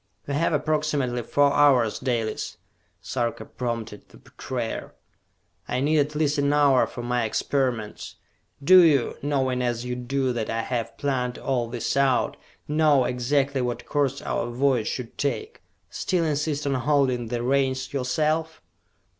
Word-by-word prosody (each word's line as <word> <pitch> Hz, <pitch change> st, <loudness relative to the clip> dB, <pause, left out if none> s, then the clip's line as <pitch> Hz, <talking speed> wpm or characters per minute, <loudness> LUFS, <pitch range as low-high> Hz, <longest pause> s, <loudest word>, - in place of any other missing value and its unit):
"We 140 Hz, -, -4 dB
have 165 Hz, +4 st, +1 dB
approximately 150 Hz, -5 st, 0 dB
four 145 Hz, +4 st, +2 dB
hours, 130 Hz, -7 st, +4 dB
Dalis!" 120 Hz, -4 st, -2 dB, 0.5 s
Sarka 120 Hz, +4 st, -2 dB
prompted 115 Hz, -4 st, -5 dB
the -, -, -16 dB
betrayer. 120 Hz, -4 st, -6 dB, 0.7 s
"I 125 Hz, -, -1 dB
need 150 Hz, +3 st, +2 dB
at 145 Hz, +1 st, 0 dB
least 150 Hz, -1 st, +1 dB
an 140 Hz, 0 st, +2 dB
hour 140 Hz, -3 st, +4 dB
for 120 Hz, -, -7 dB
my 120 Hz, 0 st, 0 dB
experiments! 115 Hz, -1 st, -2 dB, 0.5 s
Do 185 Hz, +6 st, +8 dB
you, 145 Hz, -7 st, +3 dB
knowing 130 Hz, -3 st, 0 dB
as 120 Hz, -1 st, -1 dB
you 125 Hz, 0 st, -3 dB
do 130 Hz, +1 st, -1 dB
that 115 Hz, -2 st, -3 dB
I 115 Hz, 0 st, -1 dB
have 115 Hz, -2 st, -3 dB
planned 125 Hz, -3 st, -1 dB
all 125 Hz, -3 st, -1 dB
this 120 Hz, 0 st, -3 dB
out, 135 Hz, -2 st, +2 dB, 0.3 s
know 150 Hz, -3 st, +3 dB
exactly 135 Hz, +2 st, 0 dB
what 120 Hz, -1 st, -3 dB
course 140 Hz, -2 st, -1 dB
our 120 Hz, -, -2 dB
voyage 125 Hz, -2 st, +1 dB
should 125 Hz, -3 st, -5 dB
take, 425 Hz, -, -3 dB, 0.3 s
still 180 Hz, -3 st, 0 dB
insist 150 Hz, -1 st, -1 dB
on 140 Hz, -, +1 dB
holding 130 Hz, -2 st, +1 dB
the 120 Hz, +1 st, -3 dB
reins 130 Hz, 0 st, 0 dB
yourself?" 155 Hz, +4 st, -1 dB
130 Hz, 145 wpm, -25 LUFS, 120-145 Hz, 0.7 s, Do